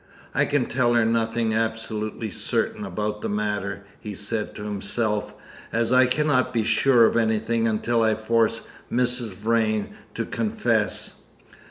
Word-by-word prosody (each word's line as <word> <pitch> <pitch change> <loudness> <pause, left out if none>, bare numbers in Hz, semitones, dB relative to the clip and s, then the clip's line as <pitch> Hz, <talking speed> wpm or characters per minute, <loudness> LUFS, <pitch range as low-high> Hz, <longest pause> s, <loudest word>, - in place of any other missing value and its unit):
"I - - +3
can 145 -4 +1
tell 120 -1 +1
her 115 -1 +4
nothing 115 0 +1
absolutely 110 -1 -2
certain - - -1
about 105 0 -3
the - - -2
matter," 105 -1 -2 0.2
he 105 -2 -7
said 105 +2 -3
to 105 - -7
himself, 105 +1 -2 0.4
"as 115 +1 +1
I 130 0 +6
cannot 130 -1 +2
be 115 -3 +1
sure 120 +1 +5
of - - +2
anything 115 0 +1
until 115 +2 +1
I 110 -1 +3
force 115 +1 +1 0.3
Mrs. 125 -4 0
Vrain 110 0 0 0.2
to - - -2
confess. - - -1
115 Hz, 145 wpm, -24 LUFS, 105-115 Hz, 0.4 s, I